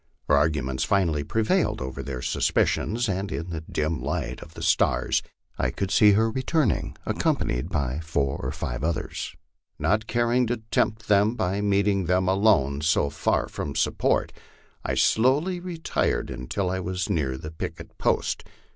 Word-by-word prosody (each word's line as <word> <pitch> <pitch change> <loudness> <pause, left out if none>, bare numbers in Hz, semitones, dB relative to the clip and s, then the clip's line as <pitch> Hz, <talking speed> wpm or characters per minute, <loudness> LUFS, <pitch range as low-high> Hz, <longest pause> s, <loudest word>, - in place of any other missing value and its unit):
Her 75 - +4
arguments 70 -3 +1
finally 85 -7 +1
prevailed 110 +8 +1
over 65 0 -5
their 65 -3 -5
suspicions, 120 +3 +1
and 100 +1 -2
in 85 +1 -4
the 80 -2 -4
dim 80 0 -2
light - - -3
of 80 - -12
the - - -7
stars - - +2 0.4
I 60 - +1
could 95 +9 -3
see 105 -1 +6
her 110 +2 +3
returning, 130 +1 0
accompanied - - 0
by 70 -2 -1
four 75 -4 -1
or - - -2
five - - -4
others. 80 0 -3 0.4
Not 110 +1 +1
caring 120 +1 +2
to 120 +1 0
tempt 110 0 +1
them 105 +3 +4
by 95 -1 -1
meeting 100 -1 +2
them 90 +2 +2
alone 95 -9 +3
so 75 -2 +2
far - - 0
from - - -5
support, - - +1 0.5
I - - -1
slowly 145 +11 +3
re 175 -1 -6
tired 160 - -1
until 90 +9 -2
I 95 - -1
was 90 -1 -2
near 65 -5 -1
the 75 +4 -7
picket 80 - -7
post. - - 0
95 Hz, 160 wpm, -25 LUFS, 75-110 Hz, 0.5 s, see